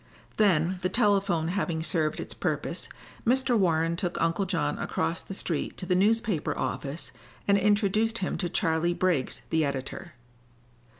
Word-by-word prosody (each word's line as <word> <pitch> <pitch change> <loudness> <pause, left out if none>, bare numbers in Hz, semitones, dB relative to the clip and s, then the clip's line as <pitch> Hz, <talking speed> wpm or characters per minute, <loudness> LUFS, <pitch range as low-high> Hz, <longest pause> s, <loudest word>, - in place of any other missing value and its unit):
Then, 185 -3 +3
the 185 - 0
telephone 195 -6 +2
having 175 -4 -1
served 155 -2 0
its - - -5
purpose, - - -2 0.3
Mr. 255 +1 +2
Warren 165 -4 +2
took 175 0 -2
Uncle 165 +4 +1
John 180 -2 -1
across 170 - -1
the 195 - -8
street 165 -5 -2
to - - -5
the 180 - +1
newspaper 210 -2 +1
office 145 +3 -3 0.4
and 200 - +5
introduced 210 +2 +2
him 185 - -1
to 175 - -1
Charley 170 0 +1
Briggs, 175 -9 0
the 160 -1 +3
editor. 140 +5 -4
180 Hz, 145 wpm, -28 LUFS, 165-200 Hz, 0.4 s, and